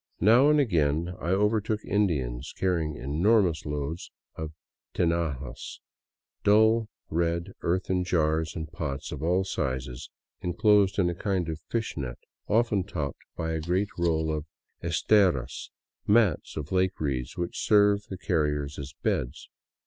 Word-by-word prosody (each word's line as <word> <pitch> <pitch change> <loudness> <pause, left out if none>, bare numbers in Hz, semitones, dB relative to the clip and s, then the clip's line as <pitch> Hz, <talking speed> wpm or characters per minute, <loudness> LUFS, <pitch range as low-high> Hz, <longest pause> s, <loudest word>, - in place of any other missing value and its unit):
Now 120 - +6
and 150 0 +5
again 85 - +1
I 85 - -3
overtook 105 +2 +1
Indians 70 -11 -1
carrying 85 -5 0
enormous 85 - +2
loads 75 +3 -4 0.3
of 80 -1 -5 0.4
tinajas, 80 -6 -2 0.6
dull 110 +2 +4 0.2
red 85 +3 0
earthen 90 +1 0
jars 80 -2 +1
and 80 -1 -5
pots 70 -4 -4
of 75 - -5
all 90 +4 +2
sizes 65 -8 -3 0.3
enclosed 100 +2 +3
in 95 -3 +3
a 85 - 0
kind 95 -1 -1
of 80 -1 -4
fish 115 -1 -2
net, 65 -4 -4 0.3
often 110 -3 +2
topped 75 -8 -4
by 80 0 -2
a 80 -1 -2
great 90 +5 0
roll 80 -2 +1
of 75 +1 -5 0.3
esteras, 85 - +2 0.4
mats 105 -5 +3
made - - 0
of 75 - -11
lake 95 0 +1
reeds 65 -4 -2
which 85 -1 -3
serve 105 -1 +4
the 95 - -6
carriers 75 -6 -1
as 70 0 -7
beds. 65 +5 -2
85 Hz, 140 wpm, -27 LUFS, 75-100 Hz, 0.6 s, Now